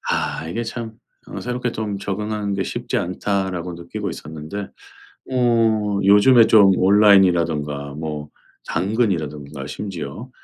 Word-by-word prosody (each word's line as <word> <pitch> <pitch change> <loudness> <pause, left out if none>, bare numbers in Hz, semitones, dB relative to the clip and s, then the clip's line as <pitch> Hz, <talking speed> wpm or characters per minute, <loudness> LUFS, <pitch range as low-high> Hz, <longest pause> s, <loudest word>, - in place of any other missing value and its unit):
아 80 - -2
이게 115 +7 -3
참 115 -1 -6 0.3
어 - - -6
'새롭게 125 0 -3
좀 105 -3 -4
적응하는 105 +1 -3
게 95 - -1
쉽지 120 0 -3
않다.'라고 90 -1 -2
느끼고 85 0 -6
있었는데 80 +6 -7 0.6
어 115 -5 +2
요즘에 105 +5 +6
좀 100 -3 +6
온라인이라든가 85 -8 +3
뭐 75 0 -6 0.4
당근이라든가 80 - -2
심지어 95 - -6
100 Hz, 280 characters per minute, -21 LUFS, 80-110 Hz, 0.6 s, 요즘에